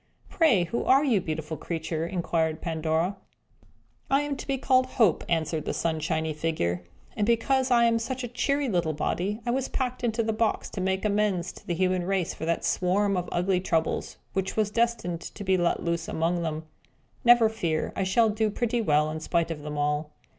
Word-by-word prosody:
"Pray, 280 - +4
who 205 +8 -2
are 270 +2 +5
you, 235 -9 +2
beautiful 160 -1 -4
creature?" 165 -1 -3
inquired 165 -3 -1
Pandora. 160 +3 -1 0.9
"I 275 +1 +3
am 290 -1 -2
to - - -8
be 275 -1 0
called 255 0 +3
Hope!" 215 -10 +4
answered 160 -2 0
the - - -2
sunshiny 160 -1 -1
figure. 150 - -1 0.3
"And 210 -1 0
because 260 +3 +2
I 240 -2 +5
am 230 -1 +3
such 255 +3 -4
a - - -2
cheery 280 +4 0
little 175 -7 0
body, 200 +8 -2
I 240 - +1
was 265 +1 0
packed 255 -2 -3
into 230 -1 +1
the 220 0 0
box, 220 0 0
to 190 - -4
make 190 +2 0
amends 200 -4 +1
to - - -16
the 175 - -1
human 185 0 +1
race 185 -2 -1
for 160 - -6
that 170 0 -1
swarm 195 +2 +1
of 180 -1 -2
ugly 180 +1 +1
Troubles, 165 -3 -1 0.2
which 190 +1 -2
was 210 -1 +1
destined 230 -8 0
to 205 - -8
be 190 -1 +2
let 175 -2 +1
loose 170 -1 -1
among 170 +2 0
them. 160 -1 -3 0.6
Never 240 -1 +7
fear! 170 -8 -2
we - - 0
shall 220 +4 +3
do 215 +1 +1
pretty 240 +2 -1
well 150 -5 +2
in 160 - -4
spite 165 +1 0
of 155 -2 -5
them 150 0 -5
all." 150 +1 0
185 Hz, 195 wpm, -27 LUFS, 160-230 Hz, 0.9 s, Never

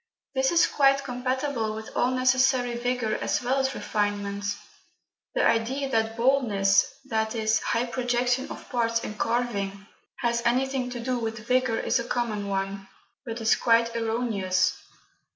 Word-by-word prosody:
This 265 -1 +2
is 340 0 +5
quite 275 -1 +3
compatible 255 -3 -2
with 220 0 -8
all 245 - +2
necessary 255 -1 +2
vigour 245 -2 -1
as - - 0
well 260 +3 +1
as 265 0 0
refinement. 205 -1 -2 0.9
The - - +3
idea 260 +5 0
that 225 -1 0
boldness 220 -7 +3
viz. 220 -2 0
high 235 +1 0
projection 245 +1 0
of - - -9
parts 230 -2 0
in - - -5
carving 205 -4 -2 0.3
has 235 0 0
anything 255 +1 +1
to 245 -1 -5
do 250 +1 -1
with 225 -1 -4
vigour 255 -2 +2
is - - +1
a - - -2
common 230 -4 -2
one, 195 0 -3 0.4
but 230 0 -4
is 220 - +4
quite 230 0 +2
erroneous. 220 -5 0
235 Hz, 145 wpm, -26 LUFS, 220-255 Hz, 0.9 s, is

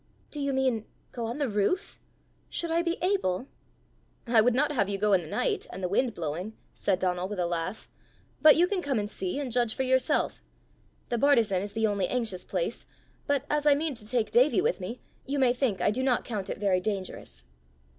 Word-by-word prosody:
"Do 295 - -5
you 280 0 0
mean, 260 -5 0 0.2
go 235 -2 -4
on 235 +4 -4
the 290 -2 0
roof? 210 - -1 0.5
Should 335 -1 -2
I 335 +1 +3
be 340 0 -1
able?" 315 - +1 0.8
"I 235 -2 +5
would 240 +2 +3
not 295 +3 +2
have 200 -9 +1
you 200 - -1
go 210 +1 +2
in 185 - +4
the 160 - -9
night, - - -1
and 190 - -7
the - - +1
wind 230 +5 0
blowing," 170 +7 -4 0.2
said 195 -2 0
Donal 180 0 -1
with 205 0 -5
a 180 - 0
laugh; 170 +4 -3 0.5
"but 305 -1 +8
you 345 - +5
can 370 0 -1
come 280 -6 -1
and 205 0 -2
see, 185 +4 -3
and 270 -4 -3
judge 240 -2 +1
for 265 - -1
yourself. 260 0 +1 0.7
The 240 - 0
bartizan 225 -9 +3
is 200 +1 -5
the 225 +1 +1
only 200 -3 +1
anxious 225 -7 -2
place, - - -3 0.4
but 285 -1 +1
as 300 0 0
I 290 - +7
mean 305 +1 -1
to 225 - -10
take 230 -2 0
Davie 250 -1 +4
with - - +1
me, 225 +7 -6 0.3
you 280 +1 -1
may 255 -3 +4
think 245 -8 -1
I 205 - +3
do 250 +5 -2
not 260 -2 +1
count 205 -5 -4
it - - -3
very 195 -3 +2
dangerous!" 185 - -5
230 Hz, 215 wpm, -28 LUFS, 195-275 Hz, 0.8 s, but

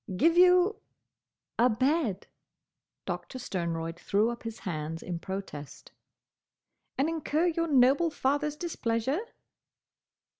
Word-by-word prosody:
"Give 330 - +4
you—?" 360 +3 +5 0.8
"A 245 +2 +5
bed." 255 - 0 0.8
Doctor 260 - -5
Sternroyd 170 -6 -3
threw 215 +4 +1
up 235 - -7
his 225 -1 -6
hands 160 -4 -4
in 175 -2 -4
protest. 190 -6 -7 1.1
"And 275 - +2
incur 320 0 0
your 335 -1 +1
noble 280 +3 +4
father's 290 +1 0
displeasure?" 265 -4 -1
255 Hz, 105 wpm, -29 LUFS, 190-320 Hz, 1.1 s, you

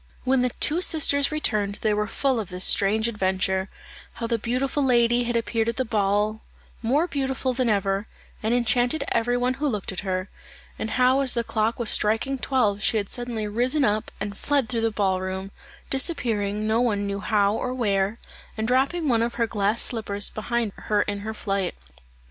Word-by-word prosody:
When 260 0 +2
the 250 - +2
two 325 +4 +2
sisters 285 -4 +3
returned 210 -10 0
they 215 -1 +2
were 210 0 0
full 265 +2 0
of 210 - -5
this 180 +1 +1
strange 215 +3 +3
adventure, 190 -3 0 0.4
how 235 - -5
the 230 0 -1
beautiful 260 +5 -1
lady 240 -1 +3
had 240 0 -2
appeared 230 0 0
at 230 - -2
the 260 - -1
ball 210 0 0 0.4
more 270 +8 +2
beautiful 265 -4 -1
than 250 -1 0
ever, 200 0 0 0.3
and 220 - -1
enchanted 245 +4 +1
every 245 +1 +1
one 250 +1 +1
who 300 - +2
looked 210 -8 -2
at 185 - -4
her; 185 -1 -2 0.5
and 220 - -3
how 255 +1 +4
as 265 -3 +2
the 235 - 0
clock 220 0 -1
was 235 -3 +3
striking 225 +6 +1
twelve 215 -7 +1
she 220 - +2
had 200 -2 -2
suddenly 240 -3 -3
risen 250 +7 +1
up 210 +1 0
and 200 0 -4
fled 280 +1 0
through 235 -2 0
the 225 - +2
ball 195 -3 0
room, 190 +1 -4 0.4
disappearing 225 - 0
no 220 +2 +2
one 205 -5 0
knew 200 0 -3
how 205 -1 +2
or 250 +3 -2
where, 205 -4 0 0.4
and 220 0 -1
dropping 275 +7 +1
one 235 -4 +3
of 235 +1 -1
her 230 - +1
glass 210 0 +1
slippers 205 -3 0
behind 230 0 -2 0.2
her 210 -1 +2
in 205 0 -4
her 220 +2 -5
flight. 195 -3 -2
225 Hz, 190 wpm, -24 LUFS, 205-250 Hz, 0.5 s, how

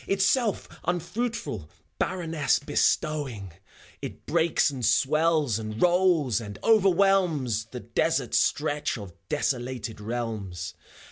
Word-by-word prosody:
Itself 200 +3 +1 0.2
unfruitful, 175 - -3 0.3
barrenness 165 -5 +1
bestowing; 140 - 0 0.5
It - - -8
breaks 160 -1 +2
and 130 -3 -6
swells, 150 -2 +2
and 110 0 -5
rolls, 175 - +3
and 105 -2 -7
overwhelms 185 - +3
The 120 +2 -8
desert - - 0
stretch 145 -2 +1
of 100 -5 -9 0.2
desolated 125 -6 -2
realms. 105 -6 -4
145 Hz, 95 wpm, -27 LUFS, 115-175 Hz, 0.5 s, rolls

